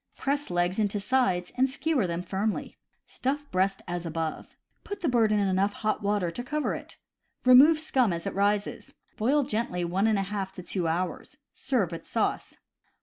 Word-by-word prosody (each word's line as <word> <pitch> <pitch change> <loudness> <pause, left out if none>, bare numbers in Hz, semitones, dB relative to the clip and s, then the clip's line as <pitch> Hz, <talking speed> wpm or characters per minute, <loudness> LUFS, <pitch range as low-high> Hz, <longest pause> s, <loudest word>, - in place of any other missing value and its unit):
Press 285 +1 -1
legs 175 +2 0
into 205 -1 0
sides 195 -6 +1
and 260 +1 +3
skewer 275 - 0
them 170 +1 -3
firmly. 200 +4 -2 0.3
Stuff 285 +3 -3
breast 190 +1 0
as 175 0 -3
above. 165 -1 -4 0.3
Put 405 - -6
the 340 - 0
bird 230 -5 +3
into 210 -1 +2
enough 195 +2 +1
hot 215 -1 -1
water 200 -4 0
to 245 - -5
cover 300 +4 -1
it. - - -8 0.5
Remove 270 +6 +8
scum 265 -8 +1
as 170 -1 -4
it - - -3
rises. 205 +1 -1 0.2
Boil 265 +6 +2
gently 215 -8 -2
one 190 +5 +1
and 220 - +3
one 195 - 0
half 195 -1 -4
to 180 - -9
two 175 -1 -2
hours. 175 - -3 0.2
Serve 240 -10 0
with 165 - -8
sauce. - - -1
205 Hz, 180 wpm, -27 LUFS, 180-255 Hz, 0.5 s, Remove